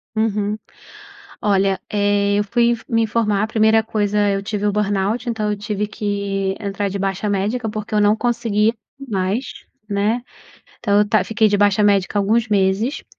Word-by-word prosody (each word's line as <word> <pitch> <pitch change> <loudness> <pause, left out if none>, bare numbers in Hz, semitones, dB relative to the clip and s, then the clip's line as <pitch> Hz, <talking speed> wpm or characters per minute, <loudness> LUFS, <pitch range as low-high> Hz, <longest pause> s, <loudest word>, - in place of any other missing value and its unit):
Uhum. 210 -1 0 0.9
Olha, 195 -2 +2
eh, 205 0 +2
eu 205 - +1
fui 235 +3 +2
in 240 - +1
me 230 -1 +2
informar. 215 -2 +1
A - - +1
primeira 220 0 +3
coisa, 210 -2 0
eu 195 0 -1
tive 205 0 -3
o 205 - +1
burnout, 210 +3 -1
então 215 -3 -1
eu 210 - -1
tive 210 0 -2
que 200 -2 -2
entrar 200 -1 -2
de 195 +1 -4
baixa 195 +1 -2
médica 210 +4 -1
porque 215 0 -5
eu 210 - +3
não 205 +1 +4
conseguia 225 -2 +1 0.3
mais, 210 -2 -2 0.4
né, 210 +4 0 0.6
então 205 -3 +2
eu 210 0 +2
tá 215 - +3
fiquei 220 -1 +2
de 205 - +1
baixa 205 0 +3
médica 200 0 +2
alguns 220 +4 +1
meses. 205 +6 0
210 Hz, 175 wpm, -20 LUFS, 200-220 Hz, 0.9 s, não